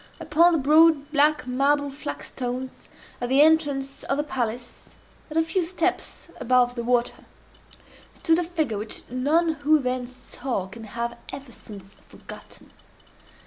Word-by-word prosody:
Upon 325 Hz, +3 st, +4 dB
the 330 Hz, -, +2 dB
broad 305 Hz, 0 st, +4 dB
black 295 Hz, -1 st, +3 dB
marble 280 Hz, +3 st, +1 dB
flagstones 250 Hz, -, -6 dB, 0.3 s
at 245 Hz, -, -2 dB
the 270 Hz, +3 st, +6 dB
entrance 285 Hz, -4 st, +1 dB
of 275 Hz, -, -1 dB
the 295 Hz, -, 0 dB
palace, 245 Hz, -4 st, -5 dB, 0.3 s
and 310 Hz, -, -4 dB
a 325 Hz, -, +4 dB
few 330 Hz, +3 st, 0 dB
steps 355 Hz, +2 st, -2 dB
above 250 Hz, 0 st, +3 dB
the 240 Hz, -1 st, -4 dB
water, 245 Hz, 0 st, 0 dB, 0.9 s
stood 330 Hz, 0 st, +2 dB
a -, -, 0 dB
figure 315 Hz, -, -2 dB
which 215 Hz, +1 st, -6 dB
none 300 Hz, +7 st, +2 dB
who 305 Hz, +1 st, +3 dB
then 255 Hz, -3 st, -2 dB
saw 250 Hz, -4 st, -5 dB
can 220 Hz, +4 st, -10 dB
have 235 Hz, +2 st, -4 dB
ever 270 Hz, -1 st, -9 dB
since 200 Hz, -3 st, -12 dB
forgotten. -, -, -13 dB
270 Hz, 145 wpm, -24 LUFS, 245-305 Hz, 0.9 s, the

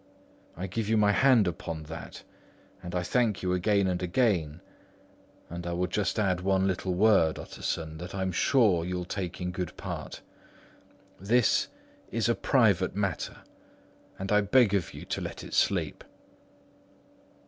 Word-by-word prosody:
I 90 Hz, -, -3 dB
give 105 Hz, +3 st, -3 dB
you 110 Hz, -, +3 dB
my 105 Hz, -1 st, +4 dB
hand 120 Hz, -2 st, +4 dB
upon 80 Hz, -2 st, -4 dB
that; 80 Hz, +2 st, -9 dB, 0.6 s
and 90 Hz, 0 st, -6 dB
I 90 Hz, -, 0 dB
thank 115 Hz, -1 st, 0 dB
you 90 Hz, 0 st, +1 dB
again 100 Hz, +2 st, +2 dB
and 90 Hz, -1 st, -1 dB
again; 90 Hz, -, +1 dB, 0.9 s
and 85 Hz, +1 st, -6 dB
I 85 Hz, -, -2 dB
will 90 Hz, +1 st, 0 dB
just 100 Hz, +5 st, -1 dB
add 95 Hz, -4 st, +1 dB
one 95 Hz, 0 st, +2 dB
little 95 Hz, -1 st, -1 dB
word, 95 Hz, -5 st, +4 dB
Utterson, 80 Hz, -1 st, -5 dB
that 90 Hz, +3 st, -7 dB
I'm 95 Hz, -1 st, -1 dB
sure 100 Hz, -3 st, +3 dB
you'll 90 Hz, 0 st, -3 dB
take 90 Hz, -1 st, -4 dB
in 90 Hz, 0 st, -3 dB
good 90 Hz, -2 st, -5 dB
part: -, -, -6 dB, 1.0 s
this 115 Hz, +5 st, +2 dB, 0.4 s
is 115 Hz, -1 st, 0 dB
a 120 Hz, -, +3 dB
private 100 Hz, -6 st, +2 dB
matter, 100 Hz, -4 st, -3 dB, 0.7 s
and 95 Hz, +1 st, -4 dB
I 105 Hz, 0 st, +5 dB
beg 105 Hz, +1 st, +4 dB
of 95 Hz, -4 st, 0 dB
you -, -, -9 dB
to -, -, -3 dB
let -, -, -6 dB
it -, -, -9 dB
sleep." -, -, +1 dB
95 Hz, 155 wpm, -28 LUFS, 90-105 Hz, 1.0 s, I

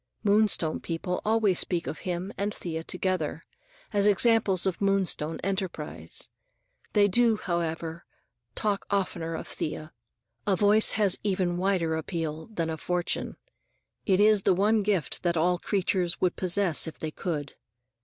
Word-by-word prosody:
Moonstone 205 Hz, -6 st, +3 dB
people 175 Hz, +2 st, -3 dB
always 215 Hz, -4 st, +2 dB
speak 175 Hz, -2 st, 0 dB
of -, -, -5 dB
him 180 Hz, +2 st, -4 dB
and 205 Hz, +1 st, -2 dB
Thea 160 Hz, -2 st, -5 dB
together, 180 Hz, -3 st, -2 dB, 0.5 s
as 205 Hz, 0 st, +3 dB
examples 205 Hz, -3 st, +3 dB
of 190 Hz, -1 st, -1 dB
Moonstone 190 Hz, -5 st, 0 dB
enterprise. 185 Hz, -, -4 dB, 0.7 s
They 205 Hz, -1 st, +5 dB
do, 230 Hz, +2 st, +3 dB
however, 170 Hz, -2 st, -3 dB, 0.5 s
talk 205 Hz, -2 st, -1 dB
oftener 175 Hz, -4 st, -1 dB
of -, -, -6 dB
Thea. 155 Hz, 0 st, -5 dB, 0.5 s
A 195 Hz, -, +4 dB
voice 210 Hz, +3 st, +4 dB
has 205 Hz, -4 st, +3 dB
even 190 Hz, -3 st, 0 dB
a -, -, -3 dB
wider 180 Hz, -4 st, +1 dB
appeal 160 Hz, -1 st, -4 dB
than 165 Hz, -7 st, -3 dB
a 160 Hz, -, -4 dB
fortune. 180 Hz, +2 st, -2 dB, 0.7 s
It 190 Hz, -2 st, +3 dB
is 210 Hz, -1 st, +5 dB
the 185 Hz, -, +3 dB
one 210 Hz, +3 st, +3 dB
gift 195 Hz, -6 st, 0 dB
that 170 Hz, -1 st, 0 dB
all 175 Hz, +2 st, +2 dB
creatures 185 Hz, -3 st, 0 dB
would 180 Hz, -1 st, +1 dB
possess 180 Hz, -3 st, +1 dB
if 160 Hz, -, -7 dB
they 155 Hz, -, -4 dB
could. 150 Hz, -4 st, -4 dB
185 Hz, 145 wpm, -27 LUFS, 165-200 Hz, 0.7 s, They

